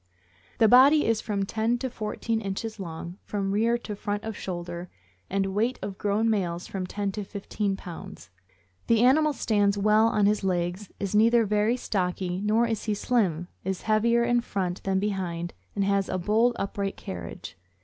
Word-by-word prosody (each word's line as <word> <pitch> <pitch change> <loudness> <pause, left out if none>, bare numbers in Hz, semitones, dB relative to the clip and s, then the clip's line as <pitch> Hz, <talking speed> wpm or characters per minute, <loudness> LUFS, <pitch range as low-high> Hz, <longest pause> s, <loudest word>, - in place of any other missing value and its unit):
The 225 - +5
body 270 +6 +7
is 225 -1 +1
from 200 -2 -1
ten 225 +4 0
to 260 +2 -3
fourteen 225 -1 -3
inches 215 +2 -4
long, 170 +1 -7
from 195 -2 -2
rear 230 +4 +2
to 215 -3 -6
front 205 0 -3
of 220 -1 -4
shoulder, 175 -2 -5 0.4
and 195 0 0
weight 230 +5 +1
of 195 -1 -5
grown 210 +2 +1
males 180 -5 0
from 185 -2 -4
ten 200 +1 -2
to 210 +1 -4
fifteen 200 0 -3
pounds. 175 - -10 0.6
The 230 0 +4
animal 305 +5 +5
stands 205 -6 +1
well 215 +2 +4
on 210 -2 +2
his 210 0 +2
legs, 180 +1 -1
is 200 0 -3
neither 230 +2 +5
very 210 +3 +2
stocky 185 -4 -2
nor 220 +3 +3
is 225 -2 -2
he 215 -2 0
slim, 190 -7 0 0.2
is 190 0 -3
heavier 230 +2 +3
in 240 0 +2
front 185 -5 -3
than 190 -1 0
behind, 185 -4 -2 0.2
and 200 - +1
has 195 0 +1
a 185 - -1
bold 220 +6 +2
and - - -1
upright 200 0 -4
carriage. 85 -2 -7
205 Hz, 180 wpm, -27 LUFS, 190-225 Hz, 0.6 s, body